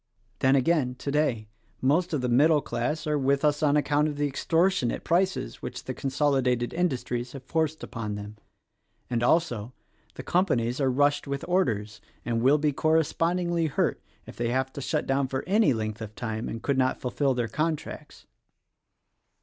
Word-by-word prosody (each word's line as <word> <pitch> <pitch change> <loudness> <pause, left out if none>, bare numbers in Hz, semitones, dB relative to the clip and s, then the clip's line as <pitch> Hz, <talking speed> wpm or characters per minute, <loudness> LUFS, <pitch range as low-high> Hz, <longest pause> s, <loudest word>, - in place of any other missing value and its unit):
Then 130 +1 +4
again, 135 -2 +2
today, 140 -5 -1 0.3
most 165 +7 +2
of 150 -5 0
the 125 - 0
middle 150 +6 +4
class 150 +5 -3
are 150 -1 0
with 140 +2 +2
us 150 0 +2
on 150 -1 +3
account 145 +1 +2
of 150 - -3
the 145 - +1
extortionate 165 0 +1
prices 185 +3 0
which - - -6
the - - -4
consolidated 130 -3 0
industries 125 -7 -2
have 135 -2 -8
forced 160 +2 -1
upon 105 -4 -4
them, 105 +1 -8 0.7
and 120 -1 0
also, 125 -5 +1 0.4
the - - -7
companies 130 -9 +1
are 135 - +3
rushed 145 +3 +2
with 140 0 -3
orders 110 - 0 0.2
and 115 -1 0
will 135 +5 +5
be 150 0 +1
correspondingly 165 +3 +1
hurt 140 - 0 0.2
if - - -11
they 120 0 -1
have 130 +2 -1
to 140 - -6
shut 150 +3 -1
down 135 0 +1
for 130 0 -3
any 210 -3 +3
length 110 -2 -3
of 110 -1 -7
time 110 -1 -4
and 115 - -6
could 140 -2 +1
not 130 0 +1
fulfill 135 +1 0
their 120 -2 -1
contracts." 155 +6 -4
140 Hz, 170 wpm, -27 LUFS, 120-155 Hz, 0.7 s, will